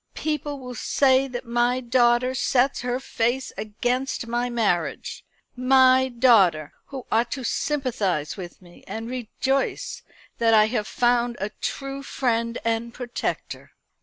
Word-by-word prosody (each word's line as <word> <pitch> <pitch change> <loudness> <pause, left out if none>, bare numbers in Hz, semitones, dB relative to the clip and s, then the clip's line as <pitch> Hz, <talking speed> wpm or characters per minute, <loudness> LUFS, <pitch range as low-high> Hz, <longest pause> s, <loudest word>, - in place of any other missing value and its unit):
"People 300 -2 -3
will 250 -2 -8
say 265 +2 +2
that 250 -1 -6
my 240 +2 +1
daughter 240 0 +2
sets 260 +1 +1
her 250 +1 -1
face 250 0 -1
against 245 +5 -2
my 240 +1 -1
marriage 205 -8 -1 0.3
my 260 0 +5
daughter, 205 - +4
who 265 -3 -7
ought 230 +2 +2
to 265 - -5
sympathise 230 - -1
with 185 -1 -9
me, 175 -1 -17
and 225 +2 -5
rejoice 265 - -2 0.4
that 225 -1 +4
I 215 0 +6
have 215 -3 -1
found 240 0 +1
a 195 +2 -2
true 275 0 -5
friend 230 -4 -1
and 230 +1 -1
protector." 245 0 -5
245 Hz, 135 wpm, -24 LUFS, 230-260 Hz, 0.4 s, I